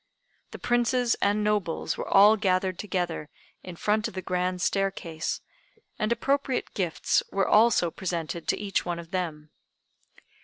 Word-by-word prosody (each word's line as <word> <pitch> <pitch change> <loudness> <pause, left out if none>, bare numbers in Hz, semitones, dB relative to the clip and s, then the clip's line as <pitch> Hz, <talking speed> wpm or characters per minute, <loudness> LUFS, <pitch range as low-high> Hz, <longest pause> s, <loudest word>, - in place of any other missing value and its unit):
The - - -9
princes 240 0 +1
and 205 +1 +2
nobles 205 -6 0
were - - -5
all 205 +2 +7
gathered 185 -3 0
together 175 -6 -3 0.3
in 180 - -9
front 210 +4 0
of - - -10
the 185 - -4
grand 180 0 -1
staircase, 175 -5 -2 0.6
and 215 0 0
appropriate 270 +2 0
gifts 175 -5 +1
were 195 -1 +1
also 215 -6 +4
presented 170 -3 -4
to - - +1
each 200 -2 -1
one 175 -1 -3
of 170 0 -10
them. 160 -5 -4
190 Hz, 145 wpm, -27 LUFS, 175-210 Hz, 0.6 s, all